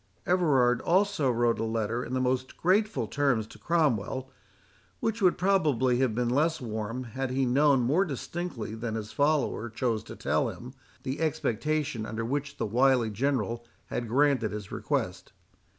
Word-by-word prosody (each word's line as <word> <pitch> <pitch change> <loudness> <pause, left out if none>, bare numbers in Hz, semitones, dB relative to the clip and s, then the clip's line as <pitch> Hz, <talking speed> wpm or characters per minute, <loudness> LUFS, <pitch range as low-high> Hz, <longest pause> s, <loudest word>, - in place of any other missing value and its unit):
Everard 135 -9 +3
also 190 -5 +2
wrote 120 -1 +1
a - - 0
letter 115 +1 -1
in 130 - -4
the - - +1
most 130 0 -1
grateful 210 +5 +2
terms 135 -7 +1
to - - -15
Cromwell, 135 - 0 0.7
which 225 0 -2
would 185 -2 +4
probably 150 -10 +2
have 130 -5 +1
been 120 0 0
less 155 +6 +1
warm 115 +1 -4
had 130 +3 -4
he 130 +1 +1
known 135 +1 +4
more 145 +11 +3
distinctly 160 - -5
than 110 0 -4
his 110 -1 -5
follower 145 -5 +1
chose 115 -1 -1
to - - -9
tell - - 0
him, 125 +2 -9 0.3
the 135 +1 -3
expectation 145 -4 -1
under 115 0 -3
which 140 +3 -3
the - - -1
wily 120 +1 +3
General 120 -1 -1 0.3
had 120 - -3
granted 135 -3 +2
his 105 -2 -6
request. - - -3
130 Hz, 160 wpm, -28 LUFS, 115-150 Hz, 0.7 s, would